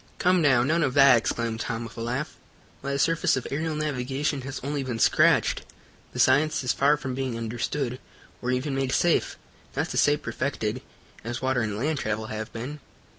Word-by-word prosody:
"Come, 180 0 +3
now, 135 -6 +4
none 160 +6 +2
of 135 -5 0
that!" 135 -2 +8
exclaimed 115 -1 -2
Tom, 115 0 -3
with 115 -1 -9
a 115 - -6
laugh. 125 +6 -3 0.5
"Why, 140 +1 -3
the - - 0
surface 165 -1 +2
of 130 - -4
aerial 155 +2 -1
navigation 140 -1 -2
has 135 +1 -6
only 145 +1 -2
been 125 -3 -3
scratched. - - +3 0.5
The - - -7
science 155 0 +3
is 125 - +1
far 145 +2 +3
from 130 -3 -4
being 130 -2 -3
understood, 120 +3 -3 0.4
or 125 - -3
even 130 +3 -1
made 135 -1 -1
safe, 175 -1 +2 0.4
not - - -1
to - - -3
say 145 0 +4
perfected, 130 -5 -3 0.4
as 120 +3 -5
water 130 -1 +1
and 105 -2 -2
land 150 +5 -1
travel 110 -1 -2
have 110 0 -5
been. 130 +6 -6
130 Hz, 190 wpm, -26 LUFS, 120-145 Hz, 0.5 s, that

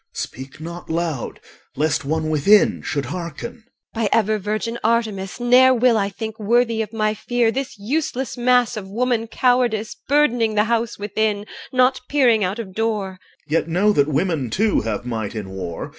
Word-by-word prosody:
speak 130 +3 -7
not 170 +2 -8
loud, 160 -5 -3 0.4
lest 150 +1 0
one 155 +2 -1
within 195 +8 +4
should 140 -2 -2
hearken. 175 - -6 0.3
EL. 230 - -3
By 210 - +1
ever 215 -1 +2
virgin 215 +4 -3
Artemis, 215 -4 0
ne'er 255 +2 +5
will 245 0 +4
I 200 -2 +1
Think 220 +2 -7
worthy 230 +1 +2
of 215 -1 -4
my 215 -1 0
fear 235 +2 0
This 270 -1 -4
useless 260 +3 -2
mass 245 -1 +2
of 195 -3 -6
woman 235 +1 0
cowardice 240 -3 +1
Burdening 245 -6 +2
the 210 - +4
house 230 0 -1
within, 205 0 -1 0.3
Not 255 0 +3
peering 245 -7 +3
out 185 +3 -1
of 205 -5 -7
door. 215 -2 -1
OR. 185 -1 -14 0.3
Yet 160 +3 0
know 190 +6 +2
that 145 -5 +3
women 155 -3 0
too 205 - +1
have 110 +1 -3
might 110 -3 -4
in 100 -3 -5
war. 90 -3 -5
215 Hz, 175 wpm, -21 LUFS, 170-235 Hz, 0.4 s, ne'er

